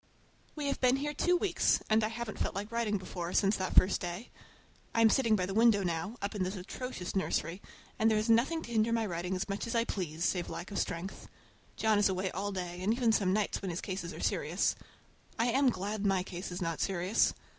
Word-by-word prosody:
We 300 -2 -3
have 280 - -1
been 255 0 +5
here 295 +2 -2
two 355 +4 +2
weeks, 380 +2 +2
and 220 0 +3
I - - +2
haven't 225 -1 -5
felt - - -1
like 205 +3 -4
writing 230 -3 0
before, 180 -2 -5
since 200 +1 +3
that 185 -1 -3
first 185 +1 +5
day. 175 +6 -5 0.6
I 230 - +4
am 220 -1 +6
sitting 230 -5 +3
by 185 -3 0
the 195 - -4
window 220 -2 +5
now, 175 +6 -2
up 200 - -2
in 205 - -4
this 185 +2 -1
atrocious 190 +1 -6
nursery, 185 -1 -1 0.4
and 220 - +4
there 215 - +3
is 215 +2 0
nothing 255 +9 +3
to 235 - -9
hinder 225 0 +2
my 230 -1 +1
writing 180 0 -2
as 185 - -2
much 200 +3 -3
as 230 - -3
I 230 - +3
please, 170 -6 -3
save 175 -2 0
lack 180 - -6
of 200 - -2
strength. 175 +4 -4 0.5
John 220 -2 +2
is 205 - +4
away 185 0 -1
all 200 +3 -3
day, 180 -2 -5
and 195 +4 +1
even 235 -1 +2
some 195 -4 +2
nights 210 +1 0
when 195 - -3
his 170 0 -3
cases 185 -3 -4
are - - -9
serious. - - +1 0.6
I 230 +2 +2
am 270 +2 +4
glad 210 -1 -3
my 195 -2 +2
case 180 0 -6
is 180 +1 -3
not 165 -1 -2
serious! 190 +2 +2
205 Hz, 230 wpm, -32 LUFS, 185-230 Hz, 0.6 s, am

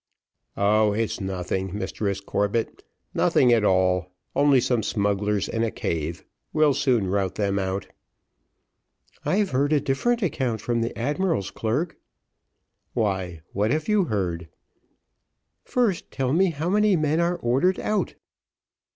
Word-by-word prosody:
"Oh, 105 +1 +3
it's 110 0 -2
nothing, 95 0 -3
Mistress 100 -2 -2
Corbett, 105 +3 -1 0.3
nothing 125 -2 +4
at 115 -2 +3
all, 90 -2 +2 0.3
only 145 -2 +5
some 125 -2 +1
smugglers 100 -1 0
in 115 - -2
a 115 - +1
cave; 80 -4 -3 0.3
we'll 155 -2 +4
soon 125 -7 +2
rout 95 0 -1
them 100 -2 0
out." 95 0 -2 1.4
"I've 200 0 +1
heard 140 +3 +1
a 150 - +4
different 230 - 0
account 130 -10 -1
from 120 +2 -1
the 115 - -3
admiral's 150 - -1
clerk." 140 +10 -2 1.0
"Why, 95 -7 -1
what 105 +2 +1
have 155 +5 0
you 210 -3 +3
heard?" 90 - -2 1.2
"First, 230 -8 0
tell 130 -1 -1
me 185 +3 +4
how 160 0 -3
many 210 0 +4
men 155 0 +1
are 170 +1 +2
ordered 135 +9 +1
out." 215 - -1
115 Hz, 135 wpm, -25 LUFS, 100-155 Hz, 1.4 s, only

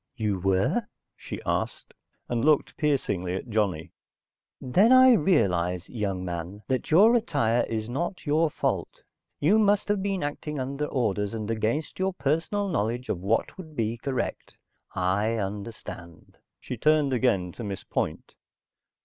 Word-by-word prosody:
"You 105 -4 -1
were?" 95 +1 +1 0.3
she - - -8
asked, - - -2 0.3
and 120 -1 -1
looked 150 -1 +3
piercingly 100 - 0
at 105 - -6
Johnny. 100 -7 0 0.7
"Then, 190 - +3
I 260 0 +8
realize, 90 - +2
young 100 -5 -2
man, 90 +4 -5
that 130 -1 -1
your 210 +9 +6
attire 140 - +1
is 110 -1 -2
not 170 +11 -3
your 155 +2 +2
fault. - - -3 0.4
You 195 +9 +4
must 205 -1 +3
have 205 -1 +1
been 195 -4 -1
acting 145 0 -4
under 140 +3 -2
orders, 105 -7 -1
and 110 0 -3
against 115 +11 -2
your 190 0 0
personal 175 +6 0
knowledge 120 - -2
of 85 - -1
what 105 - -1
would 160 -4 -10
be 115 -2 -1
correct. 130 +2 -4 0.4
I 100 +5 +1
understand." 100 -4 -7 0.2
She 125 - -6
turned 150 +1 +3
again 105 -8 +1
to 120 - -8
Miss 100 -3 -5
Point. - - -3
120 Hz, 145 wpm, -26 LUFS, 100-155 Hz, 0.7 s, I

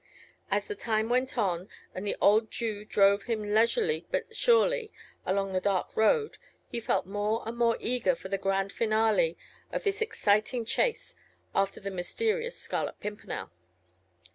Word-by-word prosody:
As - - +1
the 420 - -4
time 220 - -1
went 255 +1 +1
on, 185 -4 0 0.2
and 190 +3 -5
the - - 0
old 215 +2 +4
Jew 215 -3 -3
drove 200 -1 +3
him 215 -3 -2
leisurely 430 - +2
but - - -2
surely 475 -1 +3 0.4
along 195 0 0
the 185 - +1
dark 195 -2 0
road, 430 - +2 0.3
he 235 - -3
felt 230 - 0
more 205 +4 -1
and 230 - -4
more 235 -1 +2
eager 250 - +2
for - - -9
the 195 - -2
grand 195 0 0
finale 215 -6 +2 0.3
of - - -3
this 410 +1 -1
exciting 230 - +1
chase 470 - 0 0.4
after 195 0 0
the 195 0 -5
mysterious 455 - -1
Scarlet - - -3
Pimpernel. 210 - -6
220 Hz, 155 wpm, -29 LUFS, 200-260 Hz, 0.4 s, old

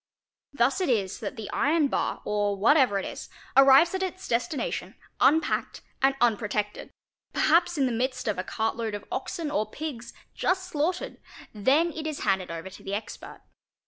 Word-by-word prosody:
Thus 275 +5 +1
it 365 - 0
is 200 -6 0
that 215 -4 -5
the 220 -2 -6
iron 300 +1 +2
bar, - - -2
or 205 -1 0
whatever 245 0 +4
it 195 - -3
is, - - -7 0.3
arrives 275 +5 +7
at 380 - -2
its 375 0 -4
destination 255 +6 -2 0.2
unpacked 320 +2 +2 0.2
and 270 +1 +3
unprotected, 210 -3 0 0.4
perhaps 345 +1 +3
in 275 - +3
the 255 - 0
midst 255 +2 -2
of 210 -3 -1
a - - -1
cartload 225 +1 -2
of 205 - -8
oxen 330 -6 -3
or 215 -7 -1
pigs, 245 -4 -6 0.2
just 370 0 0
slaughtered; 360 +9 -2 0.3
then 275 +11 +2
it 315 -1 -5
is 305 -2 -4
handed 190 -3 0
over 165 +3 -6
to - - -12
the 195 - -3
expert. 210 0 -8
255 Hz, 170 wpm, -27 LUFS, 210-315 Hz, 0.4 s, arrives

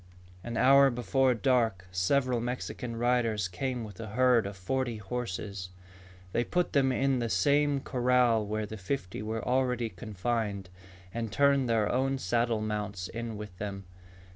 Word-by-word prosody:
An 120 -1 -4
hour 140 +1 +6
before 125 +2 +1
dark, 115 -6 +1
several 125 +7 +1
Mexican 120 -1 -4
riders 115 -4 +1
came 125 +7 -3
with 105 -4 -10
a 115 - -5
herd 120 -1 +3
of 100 -1 -8
forty 120 +4 -2
horses. 100 -3 -5 0.6
They 120 - +1
put 180 +7 -1
them 135 -3 +3
in 135 0 +1
the 120 -1 -1
same 140 +8 +2
corral 125 -3 +2
where 105 +1 -2
the 110 +1 -7
fifty 95 -1 -4
were 110 +1 -4
already 125 -2 +1
confined, 105 0 -3 0.4
and 115 -2 -3
turned 140 0 +3
their 110 -2 +2
own 135 +2 +1
saddle 120 -3 0
mounts 105 -3 -3
in 115 -1 -5
with 105 -3 -8
them. 100 -1 -5
115 Hz, 150 wpm, -29 LUFS, 105-130 Hz, 0.6 s, hour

